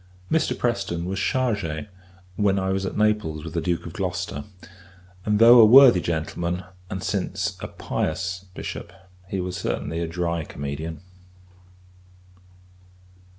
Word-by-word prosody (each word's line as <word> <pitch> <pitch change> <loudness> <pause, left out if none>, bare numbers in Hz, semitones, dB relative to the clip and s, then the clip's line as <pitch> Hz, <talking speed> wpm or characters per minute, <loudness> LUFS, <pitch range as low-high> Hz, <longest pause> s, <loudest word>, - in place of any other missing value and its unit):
Mr. 160 - +1
Preston 95 -8 -1
was 95 +1 -3
chargé, 100 -11 -1 0.5
when 100 -1 +2
I 95 0 0
was 95 0 -1
at - - -5
Naples 105 -8 +1
with 80 - -7
the 85 - -1
Duke 85 -1 -1
of 85 - -7
Gloucester; 90 -6 -3 0.8
and, 105 0 +3
though 120 +2 +8
a 110 - +10
worthy 125 -5 +8
gentleman, 85 +2 -2 0.3
and 95 0 -5
since 100 -3 -2
a - - -5
pious 90 +3 -3
Bishop, 85 - -6 0.4
he 95 - -2
was 90 0 -3
certainly 80 +2 -3
a 85 - -2
dry 85 -1 -2
comedian. 75 +4 -6
90 Hz, 135 wpm, -24 LUFS, 85-100 Hz, 0.8 s, a